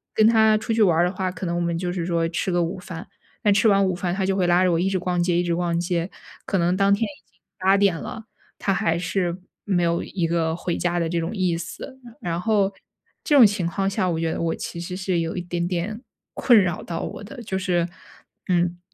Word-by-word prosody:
跟 215 - +5
他 220 -1 +5
出 215 +1 -2
去 225 - +1
玩 175 -6 +4
儿 175 - +4
的 180 - 0
话， 185 -1 -2
可 190 - -6
能 170 - -1
我 175 - 0
们 170 -1 -1
就 175 0 -2
是 175 -2 -3
说 170 -2 +1
吃 180 +2 -2
个 175 0 +2
午 180 +3 -3
饭， 180 -1 -8 0.4
但 205 -1 +5
吃 205 +3 +3
完 195 -1 +4
午 185 - +1
饭 180 0 -2
他 195 - 0
就 195 0 +1
会 185 -2 +1
拉 175 +1 +4
着 180 - +3
我 165 - +2
一 190 +2 +1
直 190 - 0
逛 180 -1 -1
街 175 0 +1
一 175 - +2
直 170 -1 0
逛 170 -1 0
街， 175 +1 -1 0.4
可 195 - +1
能 175 +1 +2
当 195 +1 +3
天 205 +3 +1
已 200 -3 -6
经 - - -36 0.2
8 190 +1 +4
点 200 -4 +3
了， 220 +6 -7 0.3
他 195 - 0
还 165 -3 +1
是 175 0 -1 0.3
没 185 -4 +1
有 170 0 +1
一 180 -4 -2
个 165 -1 0
回 175 0 -3
家 175 0 0
的 170 - 0
这 170 +1 -1
种 165 +7 -3
意 185 -4 +1
思。 190 +9 -8 0.2
然 170 0 -3
后 200 -2 +2 0.5
这 295 - +2
种 255 -5 +9
情 200 -4 +1
况 195 +3 -1
下 190 -2 0
我 165 - -1
觉 165 -1 0
得 - - -3
我 165 -1 0
其 170 - -6
实 180 +2 -5
是 190 -2 0
有 165 +1 -2
一 - - -1
点 175 0 -2
点 190 +6 -3 0.3
困 240 -5 +5
扰 180 -3 0
到 165 -1 -4
我 - - -6
的， 245 +4 -9
就 190 -3 -3
是， 175 -2 +1 0.6
嗯， 175 -1 +1
180 Hz, 275 characters per minute, -23 LUFS, 170-195 Hz, 0.6 s, 种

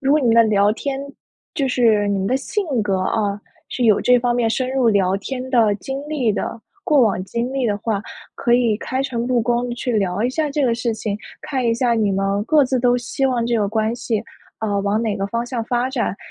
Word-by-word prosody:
如 275 0 +2
果 305 - +4
你 260 - 0
们 230 - +4
的 230 - +8
聊 210 -1 +3
天 270 +4 -4 0.5
就 275 -3 0
是 225 -5 +3
你 200 - 0
们 190 - -1
的 255 +5 +2
性 400 +10 -2 0.2
格 195 -2 0
啊， 205 +1 -1 0.3
是 250 - -2
有 215 -3 +4
这 250 0 +4
方 240 0 0
面 235 -2 +1
深 255 +2 -1
入 260 -3 +2
聊 195 -3 +2
天 255 +5 -5
的 225 -5 +4
经 270 +7 -5
历 260 -8 0
的， 225 +2 -4 0.2
过 300 -7 +3
往 200 -5 +1
经 235 +5 -3
历 270 -2 0
的 205 -2 0
话， 210 -2 -2 0.3
可 240 - 0
以 240 -3 +3
开 260 +3 -2
诚 240 -3 -2
布 250 -1 +2
公 240 +2 0
去 245 +1 -3
聊 200 -2 0
一 245 - +1
下 305 +2 -1
这 285 0 0
个 235 -2 +2
事 235 0 -1
情， 210 -2 -3 0.2
看 270 -4 -3
一 230 - +2
下 240 0 +1
你 215 -3 +1
们 195 +1 0
各 300 +3 +4
自 255 -1 0
都 245 0 +3
希 270 +2 -1
望 245 -3 0
这 235 - +1
个 205 -2 +1
关 220 +1 0
系， 225 -3 -2 0.4
啊， 205 -2 -1
往 200 +2 0
哪 215 -3 -1
个 195 -1 -2
方 235 +3 -2
向 240 -2 -3
发 245 +2 0
展， 240 -7 -1
235 Hz, 260 characters per minute, -20 LUFS, 210-255 Hz, 0.5 s, 的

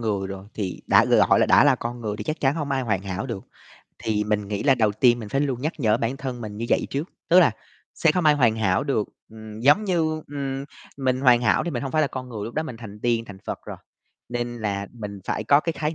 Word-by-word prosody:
người 100 -4 -1
rồi 95 0 -7
thì 95 -4 -4
đã - - +6
gọi - - +4
là - - +4
đã - - +6
là 145 -2 +5
con 120 0 -5
người 105 -2 -3
thì - - -6
chắc 155 0 -3
chắn 135 0 +2
hông 150 -3 -3
ai 135 -1 0
hoàn 105 -5 -1
hảo 100 +5 -4
được, 115 -6 -5 0.5
thì 105 -1 -1
mình 105 -1 -1
nghĩ 100 -1 -2
là 135 -2 +5
đầu 110 -4 +2
tiên 120 +3 +4
mình 110 -3 -7
phải 135 - 0
luôn 130 -4 -1
nhắc 155 +4 -1
nhở 110 -2 +3
bản 120 +3 -2
thân 130 -3 -5
mình 105 -2 -7
như 115 - -4
vậy - - +2
trước, 145 +6 -3 0.2
tức 180 +2 +7
là - - +5 0.4
sẽ 165 - +3
không 180 0 0
ai 150 - +6
hoàn 115 -6 +3
hảo 100 +2 +1
được, 135 -8 0 0.2
ừm, 110 0 -10
giống 145 - +4
như, 160 -5 0
ừm, 135 -1 -4 0.3
mình 130 -2 0
hoàn 125 -3 +5
hảo 140 - +2
thì 175 - -2
mình 125 -3 -3
hông 135 - -4
phải 155 -1 +3
là 145 - +1
con 130 -1 -6
người, 110 -4 -5
lúc 115 - -7
đó 155 - 0
mình 155 -7 -7
thành 105 -2 -10
tiên 115 -1 +1
thành 100 -3 -11
Phật - - -3
rồi, - - -6 0.5
nên 120 0 -3
là 100 -2 -2
mình 105 -4 -7
phải 110 - -2
có 140 +6 +5
cái 165 - -2
khái 155 0 -2
120 Hz, 270 wpm, -24 LUFS, 105-140 Hz, 0.5 s, tức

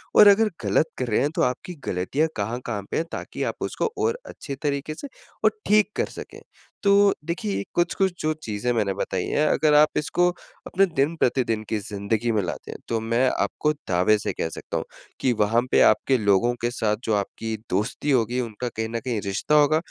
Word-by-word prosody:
और 210 - +9
अगर 210 +2 +6 0.2
गलत 160 - +3
कर 125 - -1
रहे 110 - +2
हैं, 145 - +2
तो - - +1
आपकी 125 +8 -2
गलतियाँ 95 - 0
कहाँ-कहाँ 110 -1 -3
पे - - 0
है 165 - +1
ताकि - - -5
आप - - -2
उसको 455 - -2
और 460 +2 0
अच्छी 140 - -7
तरीके 145 +1 -2
से 285 - -7 0.4
और 215 - +6 0.2
ठीक 210 0 +4
कर - - +2
सकें। - - -10 0.4
तो 200 - +4 0.3
देखिए 130 - -2
ये 100 - -2
कुछ-कुछ 175 +2 +1
जो 155 - +1
चीज़ें 110 +3 -2
मैंने 105 -4 0
बताई 95 -2 -2
है 150 - +1
अगर 155 -1 +3
आप 150 +1 +5
इसको 175 +4 +2 0.4
अपने 195 +1 +3
दिन-प्रतिदिन 135 - 0
की 110 - 0
ज़िंदगी 105 +3 -2
में 105 - +2
लाते 85 - -5
हैं। - - -7
तो 115 -1 0
मैं 115 +3 +2
आपको 150 0 0
दावे 90 +4 +3
से - - -3
कह 80 - -2
सकता - - -5
हूँ - - -3 0.4
कि, 125 - +3
वहाँ 110 +2 +2
पे - - +5
आपके 130 -2 +4
लोगों 105 +3 +3
के 120 0 0
साथ 105 -3 0
जो 110 - +1
आपकी 110 +2 -3 0.2
दोस्ती 110 +9 -1
होगी 120 0 +2
उनका, 120 +1 -4
कहीं 110 -1 -4
न 115 0 -2
कहीं 115 -5 -1
रिश्ता 100 +10 0
होगा 150 +1 +5
120 Hz, 200 wpm, -24 LUFS, 105-155 Hz, 0.4 s, और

